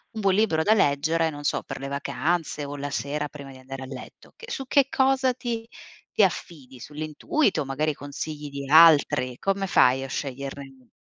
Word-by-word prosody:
un 220 - -3
buon 195 -1 +3
libro 165 -7 +2
da 215 - +4
leggere, 160 -2 +2
non 145 0 -9
so - - 0
per - - -7
le 135 - -5
vacanze 145 +3 -2
o 145 +1 -6
la 145 0 -5
sera 145 +1 -2
prima 140 -2 -11
di 130 - -13
andare 135 +1 -9
a - - -6
letto. 130 -1 -11
Che 460 - -11
su 270 - -4
che 275 0 +4
cosa 265 -2 +2
ti 235 -2 -4 0.5
ti 210 - +4
affidi? 140 -8 -3
Sull'intuito, 155 - -1
magari 150 +3 -1
consigli 145 +1 -6
di 140 -1 -7
altri, 145 -5 +6
come 195 0 -1
fai 135 -5 +4
a - - -5
sceglierne 135 -1 -6
150 Hz, 185 wpm, -25 LUFS, 140-190 Hz, 0.5 s, altri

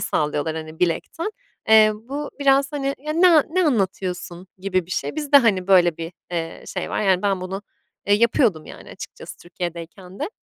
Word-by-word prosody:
sallıyorlar, 150 +1 -1
hani, 155 0 -8
bilekten. 180 - -1 0.4
Eee, 215 -1 +7
bu 270 +7 -6
biraz, 275 +1 +3
hani, 275 -1 -2
"Ya, 305 +2 -4
ne 340 0 +6
ne 370 +2 +2
anlatıyorsun?" 185 - -2
gibi 185 -2 -1
bir 185 - -15
şey. 275 - -3
Biz 300 -1 -4
de, - - +10
hani, 210 -9 +3
böyle 175 -4 +4
bir, 165 +1 -6 0.2
eee, 165 -2 -4
şey - - -5
var. - - -1
Yani, 190 -3 +2
ben 195 -2 0
bunu, 190 +2 -5 0.4
eee, 205 - +4
yapıyordum, 220 - +2
yani, - - -12
açıkçası - - -10
Türkiye'deyken 175 +2 -8
de. - - -3
195 Hz, 180 wpm, -22 LUFS, 175-275 Hz, 0.4 s, de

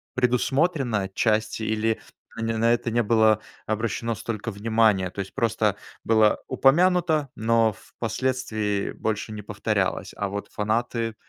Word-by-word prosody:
предусмотрено 130 - +1
отчасти, 110 +3 0
или 110 0 0 0.4
они 115 0 -2
на 115 +1 +3
это 120 - -1
не 120 +1 +1
было 110 -1 +4 0.3
обращено 115 +1 -1
столько 110 +2 -4
внимания. 105 -3 +2
То 100 - -10
есть 95 - -5
просто 110 -3 +1 0.3
было 110 -1 +4
упомянуто, 160 0 +3
но 115 -1 +2
впоследствии 110 -4 -2
больше 110 0 -3
не 105 -1 -7
повторялось. - - -1
А 100 - -1
вот 100 +1 -5
фанаты 115 +1 -1
110 Hz, 130 wpm, -25 LUFS, 105-120 Hz, 0.4 s, было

